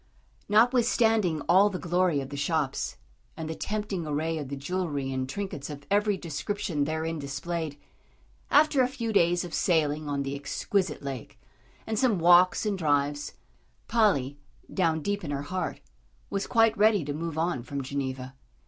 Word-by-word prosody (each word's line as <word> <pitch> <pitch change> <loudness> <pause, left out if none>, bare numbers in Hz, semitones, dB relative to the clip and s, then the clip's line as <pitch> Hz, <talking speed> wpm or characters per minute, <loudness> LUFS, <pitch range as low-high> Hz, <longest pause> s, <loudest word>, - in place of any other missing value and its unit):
Notwithstanding 225 - +3
all 195 +6 +5
the 190 - -4
glory 175 -4 +1
of 135 - -7
the 145 - -6
shops, 140 -1 -1 0.4
and 160 - -4
the 160 - -3
tempting 205 -2 -3
array 155 +2 -1
of 140 -3 -6
the 140 - -3
jewellery 140 -3 -2
and 130 0 -2
trinkets 155 -4 -5
of 145 -1 -8
every 205 0 +2
description 170 -1 -2
therein 160 +1 -2
displayed, 150 +2 -4 0.7
after 295 -2 +5
a 250 - +4
few 235 -4 -4
days 175 -1 +3
of 170 - -9
sailing 155 -3 +1
on 140 -1 -1
the 135 0 -3
exquisite 150 +4 -2
lake, 140 -1 -6 0.5
and 220 -1 -1
some 250 -6 +3
walks 175 +4 +5
and 200 -3 -1
drives, 145 -2 0 0.5
Polly, 145 - +2 0.3
down 165 -4 +1
deep 205 -1 -1
in 155 - -5
her 140 0 -2
heart, 185 +5 -3 0.5
was 200 0 -2
quite 225 -2 +4
ready 205 -5 +4
to 145 - -3
move 160 +1 -4
on 165 -5 0
from 140 +3 -5
Geneva. 130 -1 -4
165 Hz, 160 wpm, -28 LUFS, 145-200 Hz, 0.7 s, all